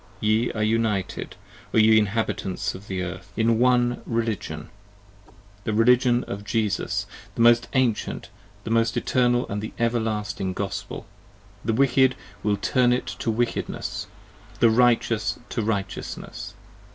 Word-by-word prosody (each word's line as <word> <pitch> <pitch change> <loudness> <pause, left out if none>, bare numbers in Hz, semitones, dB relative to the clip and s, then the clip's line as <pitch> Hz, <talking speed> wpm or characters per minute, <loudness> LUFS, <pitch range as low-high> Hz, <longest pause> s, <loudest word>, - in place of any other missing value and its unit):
Ye 110 +2 +2
are 110 - -1
united, 110 -4 -1 0.4
O - - +4
ye 110 0 +6
Inhabitants 105 -3 -1
of 100 +2 -11
Earth, 90 -1 -5
in 115 0 +3
One 125 -1 +3
Religion: 110 -10 -3 0.9
The 110 - -1
Religion 120 +2 +4
of 100 +1 -6
Jesus: 105 0 -1 0.3
the - - -1
most 120 0 +5
Ancient, 130 -5 0 0.3
the 115 - 0
Eternal 120 +2 +2
& - - -19
the 110 - -6
Everlasting 110 -5 -1
Gospel. 100 +1 -5 0.6
The 115 - 0
Wicked 130 +1 +4 0.3
will 105 -1 +1
turn 125 +4 +2
it 125 - 0
to - - -2
Wickedness, 115 -4 -2 0.5
the 115 - +5
Righteous 115 -2 +2
to 115 - -2
Righteousness. 100 -3 -4
115 Hz, 125 wpm, -24 LUFS, 105-120 Hz, 0.9 s, ye